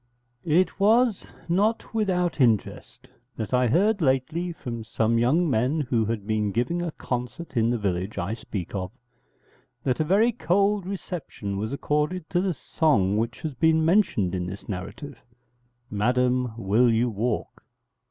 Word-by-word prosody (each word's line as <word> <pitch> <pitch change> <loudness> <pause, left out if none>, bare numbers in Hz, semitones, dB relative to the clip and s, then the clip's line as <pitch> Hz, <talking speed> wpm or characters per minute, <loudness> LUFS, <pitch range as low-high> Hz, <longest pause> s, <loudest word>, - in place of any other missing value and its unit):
It 180 +5 +2
was 225 +1 +3 0.2
not 205 +8 0
without 180 -8 0
interest 115 -5 0 0.3
that 110 +1 -4
I 125 0 +3
heard 200 - +2
lately 155 +6 0
from 120 -8 -6
some 115 +1 +1
young 150 +9 +3
men 130 +4 +1
who 120 -5 0
had 110 -2 -3
been 105 -1 0
giving 125 - -1
a 175 - -2
concert 125 +6 -5
in 115 -1 +2
the 120 - +1
village 95 -1 -2
I 100 +2 -2
speak 105 -5 -6
of, 95 -2 -3 0.9
that 130 -3 0
a - - +3
very 200 +9 +3
cold 200 -1 +1
reception 165 - -5
was 105 +4 -3
accorded 150 +4 -1
to 175 - +2
the 185 -3 -1
song 105 - +1
which 115 +1 -2
has 155 -4 -3
been 160 +4 +3
mentioned 160 - +2
in 90 -1 -2
this 100 +2 -8
narrative: 105 +8 -7 0.7
'_Madam, 125 +2 +1
will 115 +4 +3
you 115 +2 +2
walk? 115 +2 -3
125 Hz, 150 wpm, -25 LUFS, 110-175 Hz, 0.9 s, was